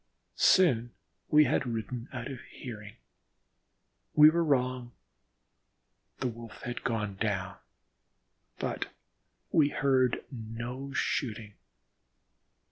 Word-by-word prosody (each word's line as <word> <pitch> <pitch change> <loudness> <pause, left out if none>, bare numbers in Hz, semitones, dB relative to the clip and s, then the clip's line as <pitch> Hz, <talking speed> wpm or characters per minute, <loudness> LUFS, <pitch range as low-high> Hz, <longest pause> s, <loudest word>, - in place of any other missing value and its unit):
Soon 125 -11 +4 0.4
we 150 0 +7
had 130 - +1
ridden 115 +1 -4
out 125 -1 -5
of 130 - -7
hearing. 105 -4 -9 1.2
We 150 +1 +9
were 170 +1 +2
wrong 125 -4 0 1.2
the 130 - -1
Wolf 115 -2 -9
had 120 0 -5
gone 105 -4 -2
down, 95 -4 -2 1.0
but - - -3 0.6
we 150 -2 +4
heard 130 -4 +2
no 120 +3 -6
shooting. 110 -6 -2
120 Hz, 95 wpm, -30 LUFS, 110-135 Hz, 1.2 s, We